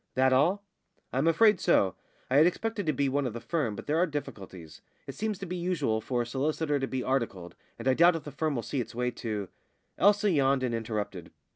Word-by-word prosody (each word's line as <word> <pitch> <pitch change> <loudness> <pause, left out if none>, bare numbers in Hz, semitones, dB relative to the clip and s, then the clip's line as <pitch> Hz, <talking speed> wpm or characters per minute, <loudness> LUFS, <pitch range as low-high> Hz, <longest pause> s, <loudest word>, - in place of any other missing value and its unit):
"That 130 0 +3
all?" 175 +10 +2 0.5
"I'm 135 +5 +1
afraid 210 +4 +5
so. 95 -2 +3 0.3
I 130 - +2
had 155 +3 +7
expected 210 +1 -2
to - - +4
be 140 -2 0
one 135 0 0
of 120 - -5
the 120 - -5
firm, 115 -3 -2
but - - -8
there 155 +2 +1
are 180 - +3
difficulties. 95 - -7 0.2
It - - -7
seems 215 -1 -3
to 195 - -6
be 180 0 -5
usual 165 -11 -1
for 120 +1 -1
a - - -8
solicitor 145 +4 -1
to 135 - -2
be 130 -1 -3
articled, 100 -10 -2 0.2
and 115 - -6
I 130 - +5
doubt 170 +5 +5
if 165 - -5
the 150 - -8
firm 150 +1 -1
will 120 - -2
see 135 +4 -2
its 115 0 -8
way 125 0 -1
to 105 -5 -4 0.3
" - - -46
Elsa 205 +1 +4
yawned 135 -4 +2
and 125 -2 -1
interrupted. 105 -6 -4
135 Hz, 235 wpm, -29 LUFS, 115-165 Hz, 0.5 s, had